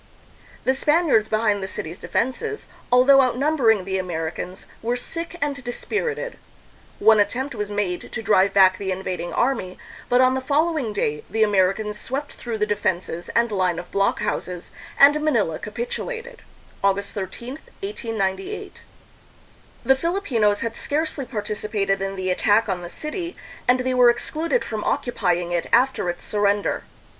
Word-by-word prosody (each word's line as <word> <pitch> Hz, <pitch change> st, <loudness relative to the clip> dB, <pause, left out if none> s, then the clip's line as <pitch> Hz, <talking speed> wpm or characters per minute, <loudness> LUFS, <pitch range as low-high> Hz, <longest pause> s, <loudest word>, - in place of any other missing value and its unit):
The 260 Hz, -, +3 dB
Spaniards 295 Hz, -6 st, +3 dB
behind 215 Hz, -2 st, +1 dB
the 190 Hz, -, -3 dB
city's 170 Hz, -2 st, -5 dB
defenses, 425 Hz, -, -2 dB, 0.2 s
although 265 Hz, +2 st, +7 dB
outnumbering 250 Hz, -5 st, +2 dB
the 190 Hz, 0 st, -1 dB
Americans, 175 Hz, +1 st, -4 dB, 0.2 s
were 235 Hz, +2 st, 0 dB
sick 330 Hz, +7 st, -5 dB
and 285 Hz, -2 st, -2 dB
dispirited. 445 Hz, -, -3 dB, 0.6 s
One 220 Hz, -1 st, +6 dB
attempt 260 Hz, +7 st, 0 dB
was 210 Hz, -3 st, -3 dB
made 205 Hz, -4 st, -2 dB
to 220 Hz, -, -4 dB
drive 200 Hz, -2 st, +4 dB
back 190 Hz, -1 st, +5 dB
the 190 Hz, -1 st, -2 dB
invading 185 Hz, -2 st, -3 dB
army, 230 Hz, -8 st, 0 dB, 0.3 s
but 245 Hz, -, +4 dB
on 255 Hz, 0 st, +5 dB
the 265 Hz, -, -1 dB
following 295 Hz, -2 st, +1 dB
day 150 Hz, -7 st, -1 dB
the 220 Hz, 0 st, +2 dB
Americans 210 Hz, +1 st, +1 dB
swept 275 Hz, +6 st, -4 dB
through 235 Hz, -2 st, -5 dB
the 210 Hz, -, +1 dB
defenses 180 Hz, -4 st, -2 dB
and 235 Hz, -1 st, +3 dB
line 185 Hz, -4 st, +1 dB
of 175 Hz, -, -7 dB
blockhouses, 185 Hz, -2 st, -1 dB, 0.3 s
and 290 Hz, +2 st, +7 dB
Manila 310 Hz, 0 st, +1 dB
capitulated 485 Hz, 0 st, -5 dB, 0.4 s
(August 200 Hz, 0 st, +1 dB
13, 235 Hz, -, -6 dB, 0.2 s
1898). 225 Hz, -, -3 dB, 1.0 s
The 265 Hz, -, +5 dB
Filipinos 265 Hz, -, +1 dB
had 230 Hz, -1 st, -3 dB
scarcely 295 Hz, -2 st, -1 dB
participated 210 Hz, -3 st, -2 dB
in 195 Hz, 0 st, -2 dB
the 185 Hz, -1 st, -1 dB
attack 210 Hz, +4 st, +3 dB
on 185 Hz, -3 st, -2 dB
the 175 Hz, -, -7 dB
city, 340 Hz, -, -5 dB, 0.3 s
and 250 Hz, +1 st, +4 dB
they 255 Hz, 0 st, 0 dB
were 250 Hz, -1 st, +6 dB
excluded 315 Hz, -, 0 dB
from 215 Hz, -2 st, -4 dB
occupying 175 Hz, -8 st, 0 dB
it 175 Hz, -1 st, -1 dB
after 245 Hz, -6 st, +3 dB
its 175 Hz, -, -4 dB
surrender. 205 Hz, -1 st, 0 dB
220 Hz, 145 wpm, -23 LUFS, 195-275 Hz, 1.0 s, although